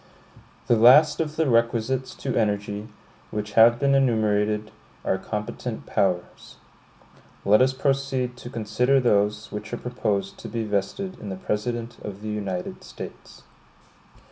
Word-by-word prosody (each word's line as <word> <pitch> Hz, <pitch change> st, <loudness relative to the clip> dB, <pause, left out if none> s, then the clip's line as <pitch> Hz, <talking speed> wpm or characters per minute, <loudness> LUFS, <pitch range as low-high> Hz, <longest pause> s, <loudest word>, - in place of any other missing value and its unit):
The 120 Hz, -, +4 dB
last 125 Hz, +8 st, +7 dB
of 155 Hz, -1 st, -3 dB
the 160 Hz, -1 st, +1 dB
requisites 120 Hz, +2 st, +1 dB
to 130 Hz, -, -3 dB
energy, 105 Hz, -1 st, -1 dB, 0.4 s
which 105 Hz, 0 st, -4 dB
have 115 Hz, +2 st, +6 dB
been 140 Hz, +2 st, +2 dB
enumerated, 110 Hz, -5 st, +1 dB, 0.3 s
are 95 Hz, -, +1 dB
competent 105 Hz, +3 st, -5 dB
powers. 95 Hz, -4 st, -2 dB, 0.9 s
Let 105 Hz, +4 st, +5 dB
us 130 Hz, 0 st, +4 dB
proceed 135 Hz, -2 st, -1 dB
to 120 Hz, -, -9 dB
consider 125 Hz, +3 st, +1 dB
those 105 Hz, -3 st, +1 dB
which 105 Hz, 0 st, -6 dB
are -, -, -1 dB
proposed 105 Hz, -6 st, -2 dB
to -, -, -8 dB
be 115 Hz, -1 st, -3 dB
vested 110 Hz, -, -2 dB
in 105 Hz, -, -7 dB
the 95 Hz, -, -4 dB
President 115 Hz, +4 st, -3 dB
of 105 Hz, 0 st, -8 dB
the 110 Hz, -, -4 dB
United 100 Hz, -4 st, -4 dB
States. -, -, -10 dB
110 Hz, 140 wpm, -25 LUFS, 105-125 Hz, 0.9 s, last